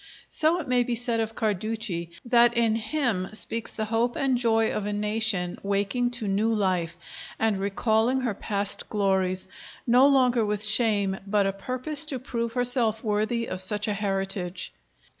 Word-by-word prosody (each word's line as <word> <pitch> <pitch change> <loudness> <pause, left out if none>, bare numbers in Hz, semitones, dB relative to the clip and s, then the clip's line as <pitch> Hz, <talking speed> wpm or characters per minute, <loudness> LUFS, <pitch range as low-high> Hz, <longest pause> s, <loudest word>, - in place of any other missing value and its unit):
So 320 +3 +1
it 315 - -6
may 250 -1 +3
be 240 0 -1
said 235 0 0
of 225 0 -2
Carducci 215 -4 -2 0.2
that 240 -1 +4
in 230 -2 +3
him 225 -4 -1
speaks 225 +2 -2
the 220 - -3
hope 230 +2 0
and 270 -2 +1
joy 225 -2 +1
of 205 -1 -3
a 210 - -2
nation 210 -3 -1
waking 200 +5 0
to 220 -3 -4
new 205 +3 +1
life, 185 -5 -1 0.4
and 220 -3 0
recalling 220 +5 +1
her 240 -4 -1
past 200 0 -2
glories, 190 -3 0 0.4
no 250 +3 +5
longer 255 -4 +3
with 210 0 0
shame 210 -3 +2
but 200 0 +2
a 195 - 0
purpose 255 +9 0
to 275 - 0
prove 235 -2 -4
herself 245 -3 +1
worthy 220 +2 0
of 185 - -1
such 210 +3 -1
a 210 - 0
heritage. 195 -2 -3
220 Hz, 165 wpm, -26 LUFS, 200-240 Hz, 0.4 s, no